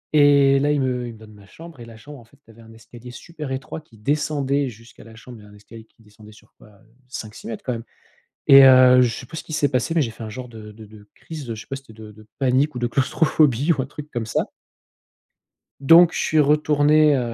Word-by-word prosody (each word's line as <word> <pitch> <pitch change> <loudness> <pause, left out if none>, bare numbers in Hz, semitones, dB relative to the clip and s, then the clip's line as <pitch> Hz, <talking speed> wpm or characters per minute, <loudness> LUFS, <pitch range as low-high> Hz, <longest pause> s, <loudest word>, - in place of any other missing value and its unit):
Et 140 -2 +4
là 145 +2 0
ils 150 - 0
me 125 -2 -2
ils 115 - -9
me - - -15
donnent 110 0 -16
ma 100 -1 -18
chambre, 165 +3 -14
et 120 - -10
la 115 -1 -14
chambre 145 +4 -13
en 120 - -16
fait 120 +5 -25
tu 115 - -19
avais 115 +1 -19
un 115 0 -16
escalier 115 +2 -14
super 150 +2 -9
étroit 135 +4 -6
qui 120 -8 -23
descendait 140 +2 -2
jusqu'à 115 -1 -16
la 115 0 -16
chambre 120 +1 -13
il - - -16
y - - -17
avait 105 - -17
un - - -16
escalier 110 +2 -15
qui 115 0 -28
descendait 105 0 -18
sur 110 0 -22
quoi? - - -19
Heu, - - -22 0.4
5-6 110 -4 -9
mètres 115 - -8
quand 125 - -2
même. 115 -1 -7 0.7
Et, 135 0 +9
heu, 130 -1 +6
je 125 - +3
sais - - -9
plus 160 - -9
ce - - -9
qui - - -11
s'est 145 -1 +1
passé, 130 +5 -2
mais 160 - +2
j'ai 120 - -3
fait 110 - -12
un 110 - -7
genre 125 +3 -9
de 110 -2 -12
de 110 +1 -14
de 105 -1 -17
crise, 155 -6 -10
heu, - - -3
je 110 - -10
sais - - -21
pas - - -7
si 135 - -13
c'était 110 0 -17
de 110 - -11
de - - -14
de 110 0 -18
panique 135 +2 0
ou - - -5
de 120 - -1
claustrophobie 140 +2 +1
ou 140 - -3
un - - -6
truc 150 +2 -11
comme 120 -4 -5
ça. 110 - -2 1.3
Donc 165 +5 +6
je - - -4
suis 155 - 0
retourné, 150 0 +3
heu, - - 0
125 Hz, 275 wpm, -21 LUFS, 110-145 Hz, 1.3 s, Et